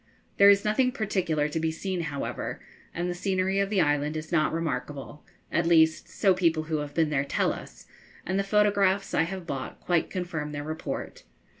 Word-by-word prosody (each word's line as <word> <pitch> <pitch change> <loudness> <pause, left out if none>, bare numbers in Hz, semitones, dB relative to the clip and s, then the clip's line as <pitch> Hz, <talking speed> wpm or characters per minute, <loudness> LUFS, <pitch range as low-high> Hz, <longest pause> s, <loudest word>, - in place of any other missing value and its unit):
There 200 0 +8
is 200 0 +5
nothing 250 +4 +2
particular 185 - 0
to 150 +2 -2
be 160 0 0
seen, 180 +3 -3
however, 140 -4 -4 0.3
and 175 +1 -3
the 180 - -1
scenery 190 +1 0
of 200 0 +1
the 200 -3 +2
island 145 0 +1
is 155 +1 -7
not 155 -3 +2
remarkable; 145 -4 -4 0.3
at 170 0 +1
least, 160 -1 +4
so 195 -3 +3
people 165 -4 +1
who 155 0 -2
have 145 -1 -5
been 160 -2 +2
there 140 -2 +1
tell 140 - 0
us, - - -11 0.4
and 190 +2 0
the - - +1
photographs 200 -1 +2
I - - +3
have 190 -2 -6
bought 135 -6 -5
quite 175 -2 0
confirm 165 -5 -4
their 145 0 -4
report. 155 +1 -5
165 Hz, 190 wpm, -27 LUFS, 155-195 Hz, 0.4 s, There